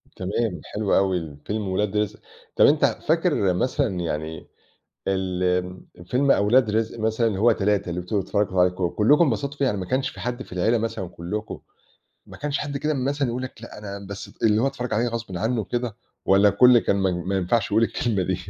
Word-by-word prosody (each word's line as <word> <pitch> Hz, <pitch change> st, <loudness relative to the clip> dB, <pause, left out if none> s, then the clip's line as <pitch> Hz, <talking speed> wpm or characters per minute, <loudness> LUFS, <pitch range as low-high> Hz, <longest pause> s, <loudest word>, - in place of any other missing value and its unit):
تمام 95 Hz, -2 st, -2 dB
حلو 105 Hz, -2 st, -1 dB
أوي 90 Hz, -6 st, 0 dB
فيلم 105 Hz, -1 st, -2 dB
ولاد 100 Hz, +2 st, -1 dB
رزق، 105 Hz, -1 st, -1 dB, 0.4 s
طَب -, -, +6 dB
أنت -, -, +5 dB
فاكر 95 Hz, -2 st, +1 dB
مثلًا 95 Hz, -1 st, 0 dB
يعني 80 Hz, -1 st, -4 dB, 0.6 s
ال 90 Hz, -1 st, -1 dB, 0.3 s
فيلم 135 Hz, +8 st, +1 dB
أولاد 110 Hz, +2 st, +4 dB
رزق 110 Hz, +2 st, -1 dB
مثلًا 110 Hz, +1 st, +1 dB
اللي 105 Hz, -4 st, -1 dB
هو 115 Hz, +3 st, +5 dB
3 105 Hz, -2 st, 0 dB
اللي 85 Hz, +1 st, -3 dB
أنتم 95 Hz, +3 st, -1 dB
بتتفرّجوا 95 Hz, -1 st, 0 dB
عليه 90 Hz, 0 st, +5 dB
ك 90 Hz, +1 st, -7 dB
كلّكم 145 Hz, +10 st, +5 dB
انبسطوا 140 Hz, +2 st, -2 dB
فيه 140 Hz, -, +2 dB
يعني 105 Hz, -6 st, 0 dB
ما 95 Hz, -, -4 dB
كانش 130 Hz, +6 st, 0 dB
في -, -, -10 dB
حد 125 Hz, +1 st, -3 dB
في -, -, -16 dB
العيلة 110 Hz, +6 st, +2 dB
مثلًا 110 Hz, -5 st, -3 dB
كلّكم، 90 Hz, +5 st, -6 dB, 0.7 s
ما -, -, -12 dB
كانش 145 Hz, -1 st, -2 dB
حد 145 Hz, -1 st, -4 dB
كده 150 Hz, +2 st, -1 dB
مثلًا 140 Hz, +1 st, -1 dB
يقول 120 Hz, +2 st, -3 dB
لك 130 Hz, -3 st, -8 dB
لأ، 115 Hz, -, -10 dB
أنا 100 Hz, -1 st, -7 dB
بس 100 Hz, 0 st, -7 dB
ت -, -, -20 dB
اللي 110 Hz, -1 st, +4 dB
هو -, -, +3 dB
اتفرج 130 Hz, -3 st, -3 dB
عليه 115 Hz, +3 st, +1 dB
غصبٍ 115 Hz, -5 st, -5 dB
عنّه 115 Hz, +4 st, 0 dB
وكده 120 Hz, +1 st, -3 dB, 0.3 s
والّا 100 Hz, +2 st, +5 dB
الكل 120 Hz, +5 st, +6 dB
كان 100 Hz, -, +1 dB
ما 95 Hz, -1 st, +1 dB
ما 90 Hz, +2 st, -2 dB
ينفعش 100 Hz, +4 st, 0 dB
يقول 110 Hz, +2 st, +3 dB
الكلمة 115 Hz, -3 st, 0 dB
دي؟ 95 Hz, 0 st, -1 dB
105 Hz, 205 wpm, -24 LUFS, 95-120 Hz, 0.7 s, طَب